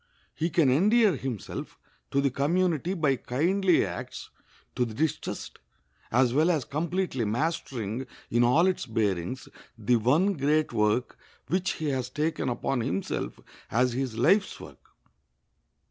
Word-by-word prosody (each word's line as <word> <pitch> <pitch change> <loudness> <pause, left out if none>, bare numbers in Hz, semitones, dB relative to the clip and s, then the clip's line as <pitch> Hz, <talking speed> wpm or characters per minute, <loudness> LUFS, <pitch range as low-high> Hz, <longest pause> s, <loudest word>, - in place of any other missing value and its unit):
He 165 +2 -1
can 155 -5 +3
endear 205 - +4
himself 130 -7 -6 0.3
to 140 - +1
the 140 -1 +1
community 170 +5 +1
by 145 -6 +1
kindly 175 +10 +2
acts - - -7 0.4
to 125 - +1
the 115 -3 -4
distressed, 155 +2 -3 0.5
as 125 +1 +3
well 155 +5 +3
as 155 -7 +1
completely 170 -3 -1
mastering, 120 -1 -2 0.2
in 120 +1 +3
all 125 +9 +4
its 185 -7 0
bearings, 105 0 -1 0.3
the 115 +2 +2
one 150 - +3
great 150 0 +1
work 105 +4 0 0.3
which 185 +1 +1
he 155 -2 -3
has 130 -3 -2
taken 150 -3 -1
upon 125 +2 -1
himself 95 -3 -3 0.3
as 125 +2 +2
his 130 -3 -3
life's 195 - +3
work. - - -12
135 Hz, 135 wpm, -27 LUFS, 120-170 Hz, 0.5 s, endear